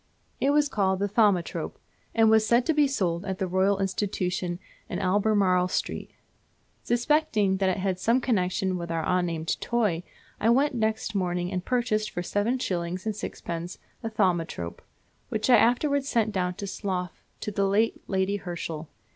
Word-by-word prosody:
It 275 - +2
was 295 0 +4
called 190 -6 +1
the 200 +2 0
Thaumatrope, 200 -4 +1 0.4
and 225 -1 +5
was 220 0 +5
said 235 +3 +3
to 320 - +2
be 295 -1 +4
sold 180 -10 -1
at 190 -1 -3
the 190 - -1
Royal 190 +2 +2
Institution, 190 -2 -1 0.3
in - - -3
Albemarle 190 -2 +2
Street. - - -3 0.7
Suspecting 240 -6 +2
that 190 -1 +2
it 185 - 0
had 190 -1 -1
some 230 +6 +3
connection 190 -5 0
with 170 -1 -5
our 165 -1 -1
unnamed 170 -3 0
toy 210 -9 +1 0.4
I 225 - +2
went 275 +5 +3
next 220 -1 -1
morning 180 -2 -1
and 180 -2 -2
purchased 220 -3 0
for 175 - -4
seven 205 +7 0
shillings 180 -4 -3
and 215 -1 -1
sixpence 175 -3 -5 0.2
a 225 - -3
thaumatrope, 170 - -1 0.5
which 215 +3 0
I 240 - +9
afterwards 275 +5 +2
sent 225 -3 +1
down 180 -3 -1
to 205 - -5
Slough 190 -3 -4 0.2
to 210 - -3
the 200 -1 +1
late 215 +3 +1
Lady 190 +1 0
Herschel. 165 -4 -5
195 Hz, 165 wpm, -27 LUFS, 180-225 Hz, 0.7 s, I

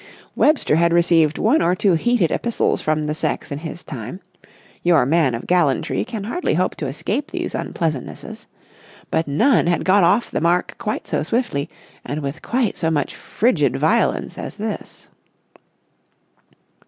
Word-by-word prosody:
Webster 295 - +3
had 170 0 +3
received 170 -3 +3
one 250 +9 +3
or 175 +2 +2
two 190 0 +2
heated 195 -1 +2
epistles 235 -1 0
from 155 0 0
the 150 0 -1
sex 155 - -3
in 140 - -3
his 165 +2 -7
time—your 150 - -3
man 145 -3 +2
of 115 - -7
gallantry 170 -7 +1
can 225 -4 -6
hardly 325 - -1
hope 180 +3 +1
to 150 - -3
escape 210 - -3
these - - -4
unpleasantnesses—but 160 +1 -5
none 215 - +3
had 175 - +1
got 190 +1 +4
off 200 +7 +2
the - - -2
mark 175 +2 +1
quite 215 -2 -3
so - - -1
swiftly, 225 - -1 0.3
and 150 +2 -4
with 140 +3 -5
quite 240 -3 -1
so 165 - +1
much 150 -3 -1
frigid 245 +3 +1
violence - - +1
as - - -6
this. 215 0 -6
170 Hz, 150 wpm, -21 LUFS, 155-215 Hz, 0.3 s, got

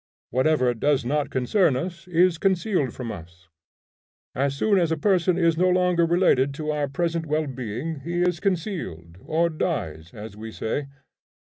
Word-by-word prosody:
Whatever 130 -1 +2
does 135 +2 +1
not 145 +3 0
concern 140 - +2
us 175 +6 -5
is 175 -1 +3
concealed 185 - +1
from 120 -2 -6
us. 85 +1 -12 0.8
As 140 +1 -1
soon 200 +4 +3
as 170 -2 +1
a 160 - +1
person 185 0 +2
is 165 -2 +2
no 185 0 +4
longer 180 -2 +3
related 145 -6 +3
to 155 0 -3
our 150 -1 -1
present 165 +3 -2
well 155 +1 0
being, 130 +4 -5
he 175 +5 -1
is 180 -2 +1
concealed, 160 - -3
or 165 +2 +1
dies, 85 - -3
as 105 -1 -9
we 110 +1 -8
say. 135 +6 -3
155 Hz, 165 wpm, -24 LUFS, 125-175 Hz, 0.8 s, no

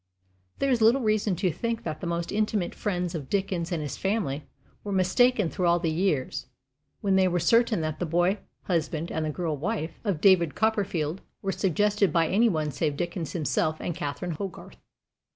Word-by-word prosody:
There 275 - +1
is 240 -3 +2
little 235 +5 +5
reason 215 -3 +1
to 185 0 0
think 230 +7 -3
that 155 - -4
the 175 - -3
most 170 0 -2
intimate 210 -3 0
friends 180 -3 -2
of 150 -6 -5
Dickens 190 -3 -1
and 170 -3 -1
of - - -3
his 145 - -5
family 190 -8 -1 0.4
were 205 - -4
mistaken 205 +3 +3
through 180 +2 -1
all 170 0 +4
the 165 -2 -1
years 155 -6 -1 0.5
when 195 -2 +2
they 190 -1 +4
were 175 -1 +1
certain 230 +2 +3
that 155 -1 -3
the 175 - -1
boy 175 +5 +2 0.2
husband 165 -1 -1
and 160 - -1
the - - -1
girl 160 0 -2
wife 165 +1 -3
of 200 -8 -1
David 170 -5 +4
Copperfield 195 -6 0 0.2
were 195 - 0
suggested 200 +1 +2
by 165 +1 +3
any 225 +7 +4
one 155 -5 -1
save 145 +1 -1
Dickens 175 -1 -3
himself 155 -1 0
and 175 - -3
Catherine 170 +1 -4
Hogarth. 185 +3 -7
180 Hz, 190 wpm, -27 LUFS, 160-205 Hz, 0.5 s, little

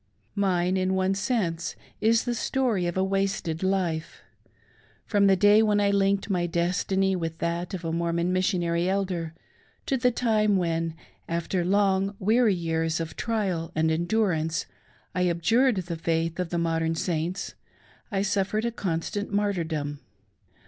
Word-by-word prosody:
Mine, 185 -2 +1
in 185 0 +1
one 190 0 +1
sense, 195 -6 -1 0.2
is 225 +1 +3
the 245 - -1
story 235 -6 0
of 175 - -3
a 190 - +2
wasted 195 -4 -1
life. 185 -4 -1 0.8
From 200 -2 +3
the 195 - +5
day 205 +3 +6
when 210 -2 +3
I 200 -1 +3
linked 195 0 +2
my 180 -4 0
destiny 185 +3 +1
with 165 -2 -3
that 170 +2 -2
of 175 -2 -7
a 165 - -1
Mormon 170 +1 0
Mis 185 0 +2
sioHiiry 170 -1 0
Elder, 185 -4 -1 0.5
to 270 - +1
the 250 0 +3
time 215 -4 +2
when, 165 -2 -1 0.3
after 170 +2 -1
long 195 +1 +2
weary 220 +1 +3
years 165 -1 -1
of 165 -1 -5
trial 195 -8 -2
and 160 0 +2
endurance, 170 -2 0 0.5
I 180 0 +1
abjured 225 +10 +3
the 175 -3 -4
faith 165 +1 -1
of 180 -2 -1
the 175 - -2
modern 165 -1 0
Saints, 170 +3 -2 0.6
I 195 -1 0
suffered 200 +2 0
a 235 - 0
constant 200 0 -3
martyrdom. 165 -8 -1
185 Hz, 150 wpm, -26 LUFS, 165-200 Hz, 0.8 s, day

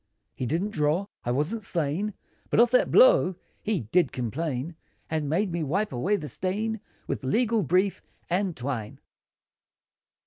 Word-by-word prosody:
He 125 - -3
didn't 175 - -1
draw, 155 +3 +1 0.2
I - - -3
wasn't 150 - 0
slain, 180 +3 -1 0.3
But - - +2
of 235 0 +6
that 250 - +4
blow, - - +6 0.3
he 210 -4 0
did 170 - +2
complain, 135 +5 -3 0.4
And 155 -3 -1
made 185 +5 +1
me 170 0 -2
wipe 180 +5 -1
away 180 +12 +1
the 155 -7 -4
stain, 210 - -2 0.3
With - - -3
legal 225 - +2
brief, 185 +4 +1 0.3
and 180 0 0
twine. 120 -4 -4
175 Hz, 145 wpm, -27 LUFS, 145-210 Hz, 0.4 s, of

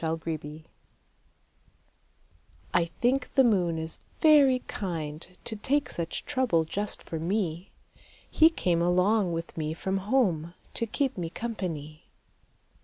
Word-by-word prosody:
II 160 0 +1
The 160 -1 -4
Kind - - -27
Moon 150 +2 -9 2.1
I 175 -1 +4
think 245 +10 0
the 265 - +7
moon 180 -8 +2
is 160 0 -4 0.2
very 280 -5 +6
kind 160 -5 -4 0.2
To 220 - -4
take 275 +7 0
such 170 -1 -3
trouble 255 - +1
just 205 +6 -3
for 165 - -5
me. 175 0 -2 0.6
He 320 - +6
came 175 - 0
along 180 +3 +3
with 165 0 -4
me 155 0 -2
from 190 +3 -1
home 175 -10 +1 0.2
To 230 - -1
keep 265 0 -1
me 170 -2 -3
company. 165 -8 -5
180 Hz, 135 wpm, -28 LUFS, 165-235 Hz, 2.1 s, the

